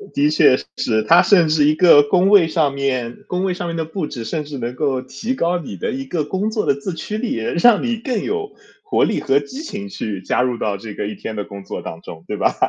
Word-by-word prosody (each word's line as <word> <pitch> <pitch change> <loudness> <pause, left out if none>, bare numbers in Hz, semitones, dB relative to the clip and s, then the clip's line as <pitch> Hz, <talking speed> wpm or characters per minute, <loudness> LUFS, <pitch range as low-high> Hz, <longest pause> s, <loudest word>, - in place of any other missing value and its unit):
的 145 +1 +3
确 130 -4 +5 0.2
是， 110 -2 +1
他 175 +2 +7
甚 175 -6 +4
至 155 -2 +3
一 150 +1 +3
个 160 -4 +7
工 180 +6 +3
位 200 -5 +6
上 155 -4 +1
面 130 -4 -3
工 180 +1 -2
位 190 -1 0
上 175 -1 -5
面 165 - -3
的 165 - -1
布 160 -1 -4
置， 115 - -6
甚 150 +7 -3
至 145 -2 -7
能 120 0 -4
够 135 -3 0
提 135 - -4
高 175 -4 0
你 135 - -7
的 90 - -3
一 135 +1 -4
个 155 +2 -2
工 195 +7 -2
作 215 -1 -2
的 140 - +2
自 140 +7 -5
驱 210 +5 -5
力， 225 - -2
让 180 - +3
你 235 -2 -1
更 235 -1 -2
有 420 0 -3 0.3
活 - - +1
力 - - +1
和 135 +1 +2
激 205 - -8
情 205 -10 -6
去 110 - -5
加 95 - 0
入 125 -1 0
到 105 -3 -2
这 105 +1 -8
个 100 - -4
一 105 - -5
天 110 +3 -6
的 105 - -3
工 100 0 -10
作 - - -6
当 80 - -8
中， 80 0 -11
对 105 - -4
吧？ - - +1
150 Hz, 280 characters per minute, -19 LUFS, 125-190 Hz, 0.3 s, 他